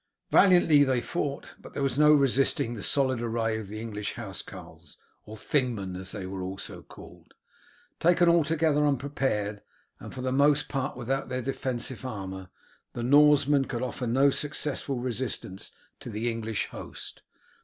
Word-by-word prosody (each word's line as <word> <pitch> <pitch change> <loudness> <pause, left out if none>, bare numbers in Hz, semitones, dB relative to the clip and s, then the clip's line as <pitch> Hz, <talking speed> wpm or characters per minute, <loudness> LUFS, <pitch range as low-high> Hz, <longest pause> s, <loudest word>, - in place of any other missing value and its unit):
Valiantly 175 -6 +6
they 130 -3 +1
fought, 140 +1 -4
but - - -14
there 140 - -1
was 135 0 0
no 150 0 +7
resisting 135 -4 +2
the 110 - -7
solid 130 -2 +1
array 115 -1 -1
of 110 - -7
the 105 +2 -7
English 105 -2 -5
housecarls, 100 -6 -9 0.3
or 110 +1 -9
Thingmen 110 -8 -1
as 95 +1 -4
they 100 -3 -5
were 95 0 -5
also 95 +2 -6
called. - - -15 0.6
Taken 175 +1 +4
altogether 160 -2 +3
unprepared, 130 -7 -1 0.4
and - - -9
for 130 - -7
the 130 0 -1
most 145 +2 +3
part 135 -2 -3
without 135 +3 -2
their 130 0 -3
defensive 130 -1 -3
armour, 95 -6 -6 0.4
the 120 - -4
Norsemen 145 +1 +5
could 120 -1 -4
offer 125 0 -3
no 135 +4 +4
successful 145 -2 -2
resistance 120 -6 -4 0.3
to - - -8
the 115 +2 -2
English 115 -2 -3
host. - - -9
130 Hz, 155 wpm, -27 LUFS, 110-140 Hz, 0.6 s, no